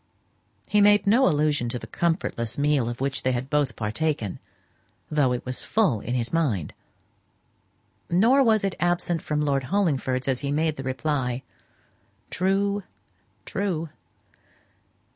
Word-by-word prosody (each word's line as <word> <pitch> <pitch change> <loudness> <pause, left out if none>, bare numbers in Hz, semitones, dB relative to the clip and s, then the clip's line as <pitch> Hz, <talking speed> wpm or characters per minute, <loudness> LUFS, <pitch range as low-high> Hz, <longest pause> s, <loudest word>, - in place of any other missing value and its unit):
He 210 - +2
made 205 +1 +5
no 235 +7 +5
allusion 150 -6 +1
to 125 - -3
the 115 - -8
comfortless 115 -4 -2
meal 145 -4 +2
of 120 +1 -6
which 135 0 -1
they 130 - +1
had 125 +2 -4
both 145 -3 +1
partaken, 110 -1 -2 0.7
though 145 -4 +2
it 125 - -3
was 125 0 -2
full 195 - +1
in 120 +5 -3
his 120 +2 -2
mind. 125 - 0 1.4
Nor 230 +11 +4
was 220 -5 +3
it 195 -2 0
absent 175 -1 0
from 150 0 -1
Lord 135 -2 0
Hollingford's 135 -8 0
as 130 -2 +1
he 140 - -2
made 155 -2 0
reply, 130 -2 -2 0.9
"True, 200 +2 +1 0.6
true. 180 -5 -2
150 Hz, 135 wpm, -25 LUFS, 130-180 Hz, 1.4 s, made